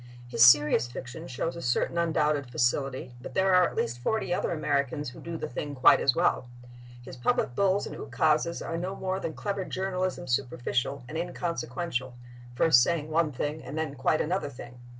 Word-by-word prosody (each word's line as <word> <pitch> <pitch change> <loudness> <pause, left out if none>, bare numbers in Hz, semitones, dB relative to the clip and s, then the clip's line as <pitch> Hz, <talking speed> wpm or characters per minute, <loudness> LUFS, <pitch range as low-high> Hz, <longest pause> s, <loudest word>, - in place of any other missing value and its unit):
His 120 -1 +3
serious 145 -1 +6
fiction 125 +1 -8
shows 130 +6 -3
a 170 - -7
certain 125 +4 0
undoubted 150 -5 +1
facility, 125 +1 -1
but - - -9
there 190 0 +3
are 180 -1 +6
at - - -8
least 120 +1 -2
forty 200 - -1
other - - -1
Americans 145 -3 -1
who - - -13
do 170 -1 -6
the - - -4
thing 145 +3 -5
quite 130 - +6
as 130 - +3
well. 120 - +1 0.5
His 130 - -9
public 120 0 0
bulls 200 +5 +2
and - - -7
ukases 155 +5 0
are 165 - -3
no 185 +3 -4
more 190 0 -2
than 165 - -4
clever 200 -2 -3
journalism—superficial 140 -9 -2
and 160 +5 -4
inconsequential, 165 -6 -3 0.4
first 125 -2 +5
saying 155 +2 0
one 160 -1 +2
thing 145 +4 -4
and 145 - -7
then 160 -3 -2
quite 140 +3 +1
another 170 -2 -1
thing. 125 -2 -11
150 Hz, 180 wpm, -28 LUFS, 125-170 Hz, 0.5 s, serious